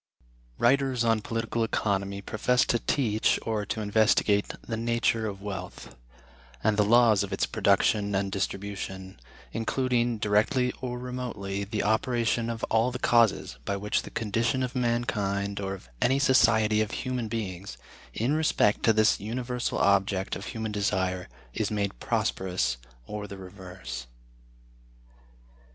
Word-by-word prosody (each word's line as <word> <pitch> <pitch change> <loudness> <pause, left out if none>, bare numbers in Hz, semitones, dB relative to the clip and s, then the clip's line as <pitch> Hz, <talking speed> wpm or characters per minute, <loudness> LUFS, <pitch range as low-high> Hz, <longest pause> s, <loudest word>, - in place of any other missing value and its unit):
Writers 130 0 +2
on 115 -2 +2
Political 115 +1 -2
Economy 100 -2 -1
profess 120 +5 +2
to 120 - +1
teach, 110 -3 +1
or 110 -3 -2
to 110 - -2
investigate, 105 -1 +3 0.2
the 115 - -2
nature 115 -1 0
of 100 -1 -7
Wealth, 95 -3 -7 0.7
and 110 - +3
the 105 - +4
laws 115 -1 +5
of 100 -1 -3
its 95 - +1
production 100 +1 +2
and 95 0 0
distribution; 95 - -4 0.3
including, 120 0 0
directly 110 +5 +2
or 125 -1 -3
remotely, 120 -6 -4
the 105 +1 -2
operation 115 +1 +1
of 115 -1 -5
all 115 +2 +2
the 125 - -4
causes 115 - +2
by 100 - -2
which 105 +1 0
the - - -9
condition 115 +4 0
of 125 - -3
mankind, 105 -5 -1
or 95 -1 -3
of 90 - -15
any 130 +2 +3
society 110 -5 +4
of 110 - -1 0.2
human 125 -3 -2
beings, 100 -4 -5 0.3
in 115 - 0
respect 155 -9 +2
to 115 - +4
this 110 0 +3
universal 120 +3 -3
object 95 -1 +2
of - - -7
human 110 -2 -4
desire, 95 -3 -1 0.2
is 105 - -1
made 100 - -2
prosperous 75 -11 -1 0.3
or 105 +8 -5
the 100 - -8
reverse. 95 -10 -8
110 Hz, 140 wpm, -27 LUFS, 100-120 Hz, 0.7 s, laws